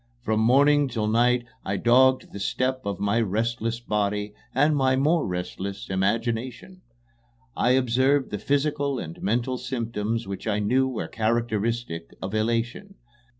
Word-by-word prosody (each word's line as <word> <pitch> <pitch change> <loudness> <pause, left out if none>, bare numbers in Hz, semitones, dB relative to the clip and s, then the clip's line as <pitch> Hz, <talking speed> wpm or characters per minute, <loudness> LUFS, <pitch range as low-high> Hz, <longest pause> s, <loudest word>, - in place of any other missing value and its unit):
From 110 -1 0
morning 140 +5 +4
till 115 -4 -2
night 120 +2 +2 0.2
I 100 +1 -2
dogged 130 +3 +4
the 100 - -7
steps 130 +5 -1
of 100 -3 -3
my 100 +3 +1
restless 115 +2 -1
body 105 -2 -1 0.2
and 145 +3 +3
my 130 -2 +3
more 150 +5 +2
restless 95 +2 -5
imagination. 115 - -2 0.7
I 125 - +3
observed 130 +2 +2
the 105 - -3
physical 145 0 0
and 80 -7 -7
mental 120 +5 0
symptoms 115 -4 -3
which 100 +2 -6
I 105 -2 +1
knew 125 +6 +2
were 130 -4 -4
characteristic 115 -5 -2
of 95 +2 -5
elation. 115 - -1
115 Hz, 140 wpm, -25 LUFS, 105-130 Hz, 0.7 s, morning